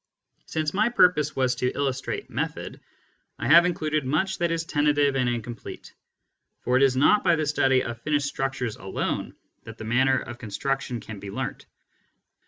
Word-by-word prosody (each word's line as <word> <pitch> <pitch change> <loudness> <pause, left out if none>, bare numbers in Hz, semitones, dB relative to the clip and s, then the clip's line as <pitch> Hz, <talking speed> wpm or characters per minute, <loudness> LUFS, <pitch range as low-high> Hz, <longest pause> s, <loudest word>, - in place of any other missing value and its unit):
Since 155 -1 -2
my 215 +4 +2
purpose 180 - +3
was 130 -1 +2
to 125 +1 0
illustrate 135 -2 -2
method, - - -4 0.6
I - - -3
have 170 +5 +7
included 155 -3 -1
much 155 +9 0
that 170 0 +1
is 165 0 -1
tentative 145 -3 +2
and 130 -2 +1
incomplete, 120 -1 -6 0.7
for 125 - 0
it 130 - +4
is 135 -2 +4
not 205 +10 +4
by 175 -2 +4
the 155 -1 -1
study 135 -3 +2
of 120 0 -6
finished 145 +1 0
structures 135 -4 -3
alone 95 - -3 0.3
that - - -10
the - - -8
manner 130 +3 +3
of 120 - -6
construction 125 +2 -3
can 105 -1 -9
be 100 - -8
learnt. - - -5
135 Hz, 170 wpm, -25 LUFS, 125-155 Hz, 0.7 s, have